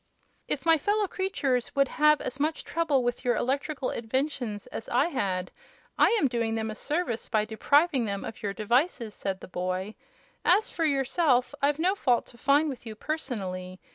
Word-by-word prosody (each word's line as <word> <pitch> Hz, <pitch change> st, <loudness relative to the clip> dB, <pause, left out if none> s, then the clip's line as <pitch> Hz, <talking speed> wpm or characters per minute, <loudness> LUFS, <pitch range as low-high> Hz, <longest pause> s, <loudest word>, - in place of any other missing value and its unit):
"If 280 Hz, -, -3 dB
my 325 Hz, -1 st, +6 dB
fellow 415 Hz, +6 st, +1 dB
creatures 290 Hz, -11 st, -1 dB
would 275 Hz, 0 st, +4 dB
have 300 Hz, -1 st, +4 dB
as 270 Hz, -, -5 dB
much 310 Hz, +2 st, 0 dB
trouble 305 Hz, -6 st, +1 dB
with 245 Hz, 0 st, -2 dB
your 245 Hz, -2 st, +2 dB
electrical 275 Hz, +3 st, -1 dB
inventions 240 Hz, -3 st, -2 dB
as 225 Hz, -, -7 dB
I 275 Hz, +7 st, +2 dB
had, 185 Hz, -, -2 dB, 0.4 s
I -, -, +5 dB
am 285 Hz, -, +3 dB
doing 230 Hz, -2 st, -1 dB
them 220 Hz, -1 st, -2 dB
a -, -, -4 dB
service 290 Hz, -1 st, -2 dB
by 215 Hz, -2 st, +2 dB
depriving 280 Hz, +5 st, +2 dB
them 200 Hz, -2 st, -3 dB
of 225 Hz, -, -8 dB
your 205 Hz, -3 st, -2 dB
devices," 235 Hz, -, 0 dB
said 190 Hz, -2 st, -4 dB
the -, -, -9 dB
boy. 185 Hz, +3 st, -3 dB, 0.5 s
"As 410 Hz, +6 st, +3 dB
for 330 Hz, -, -1 dB
yourself, 270 Hz, -2 st, +2 dB
I've 285 Hz, +1 st, +2 dB
no 360 Hz, +4 st, +2 dB
fault 250 Hz, -11 st, +1 dB
to -, -, -17 dB
find 285 Hz, +3 st, +3 dB
with 265 Hz, -5 st, -5 dB
you, 220 Hz, -2 st, -7 dB
personally. 190 Hz, -10 st, -4 dB
255 Hz, 180 wpm, -28 LUFS, 220-300 Hz, 0.5 s, my